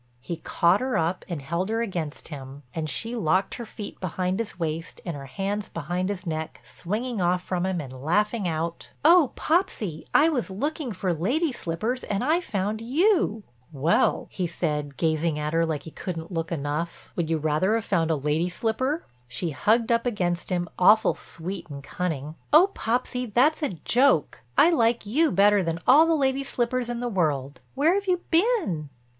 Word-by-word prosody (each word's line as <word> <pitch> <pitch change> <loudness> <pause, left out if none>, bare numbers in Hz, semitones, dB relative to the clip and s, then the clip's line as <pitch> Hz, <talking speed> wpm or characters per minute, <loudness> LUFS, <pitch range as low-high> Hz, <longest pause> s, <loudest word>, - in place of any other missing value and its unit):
He 165 +7 -5
caught 170 +4 +2
her 255 0 0
up 165 +3 0
and 160 -6 -4
held 170 +7 -2
her 225 +1 0
against 170 -8 -5
him, 140 -1 -9
and 160 -2 -3
she 225 - -2
locked 185 -2 +1
her 235 - -6
feet 210 - -8
behind 185 +2 -2
his 230 - -4
waist 165 -1 -4
and 170 -4 -3
her 140 -1 -8
hands 200 - -3
behind 175 +4 -2
his 195 -2 -4
neck 160 -1 -4
swinging 215 +4 -3
off 180 +1 +1
from 180 0 -1
him 185 -2 -1
and 135 -4 -7
laughing 195 - 0
out: 165 +1 -3 0.2
"Oh, 330 -4 +7
Popsy, 270 - 0
I 305 - +5
was 275 -10 0
looking 280 - -3
for 185 -2 -1
lady 265 - 0
slippers 225 +5 -3
and 200 +2 -2
I 320 +6 +2
found 210 - -2
you." 275 - +2 0.3
"Well," 150 +3 +2
he 180 -2 -2
said, 150 -4 -3
gazing 160 -1 +1
at 150 +1 -2
her 165 0 +2
like 155 -3 -2
he 160 - -9
couldn't 165 0 -6
look 165 -1 -3
enough, 150 +2 -3
"would 165 -3 -1
you 165 - +2
rather 155 +7 +1
have 225 - -1
found 165 -4 +1
a 160 - +3
lady 150 +4 0
slipper?" 260 - -1 0.2
She 160 +8 -2
hugged 220 - +2
up 230 +1 +2
against 180 -6 -1
him, 175 -1 -1
awful 215 +5 +6
sweet 175 +1 -7
and 140 -1 -8
cunning. 155 -3 -3 0.2
"Oh, 350 +7 +7
Popsy, 250 +2 -1
that's 265 +9 +3
a 295 - +1 0.2
joke. 250 - +3 0.2
I 335 - +7
like 235 -7 +2
you 300 +10 +2
better 200 +2 +5
than 165 -2 -1
all 310 +5 +7
the 330 - +3
lady 270 -2 +1
slippers 245 -2 -1
in 240 0 -3
the 245 - -1
world. 150 - -1
Where 300 +6 +4
have 400 0 -1
you 360 -1 +2
been?" 330 - +1
185 Hz, 185 wpm, -26 LUFS, 165-240 Hz, 0.3 s, Oh